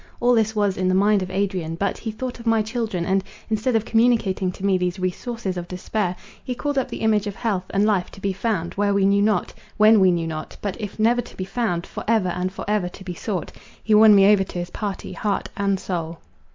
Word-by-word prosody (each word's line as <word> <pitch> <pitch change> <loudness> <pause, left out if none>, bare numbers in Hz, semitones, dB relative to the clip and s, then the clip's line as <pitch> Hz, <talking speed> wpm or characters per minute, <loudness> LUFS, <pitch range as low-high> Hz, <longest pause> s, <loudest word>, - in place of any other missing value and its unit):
All 245 +1 +4
this 220 -1 +2
was 205 -2 +1
in 185 0 0
the 185 - +2
mind 205 +1 +3
of 185 - -4
Adrian; 185 -4 -2
but 195 +3 -2
he 225 - -4
thought 245 +3 -5
of 235 - -8
my 225 -1 +3
children, 220 -6 -2
and, 190 +1 +1 0.3
instead 220 +3 +1
of 225 0 +1
communicating 225 -6 +2
to 190 - -6
me 195 -1 +3
these 180 -1 -1
resources 190 +2 -3
of 175 -1 -5
despair, 185 +1 -2 0.3
he 250 - -4
called 290 +3 -2
up 265 - 0
the - - -6
image 215 -2 +2
of 200 - -4
health 200 -6 -1
and 200 +1 +2
life 200 -4 +1
to - - -11
be 195 0 -1
found, 190 -4 -2
where 200 0 +1
we 195 -1 +3
knew 200 +1 +4
not—when 215 +1 +2
we 190 -1 +5
knew 170 -2 0
not; 155 -1 -6
but 200 -2 -3
if 210 -2 -6
never 235 +3 +3
to - - -14
be 185 - -3
found, 195 -4 -2
for - - -7
ever 220 -5 +2
and 180 +1 -2
for 195 - -7
ever 205 -4 0
to 190 - -12
be 185 -1 -5
sought. 185 0 -4 0.3
He 220 - +1
won 210 0 +8
me 200 +1 +7
over 195 -2 +3
to 185 - -8
his 175 0 -4
party, 200 -3 -5
heart 200 +1 -2
and 200 -1 0
soul. 170 -3 -4
200 Hz, 245 wpm, -23 LUFS, 185-220 Hz, 0.3 s, won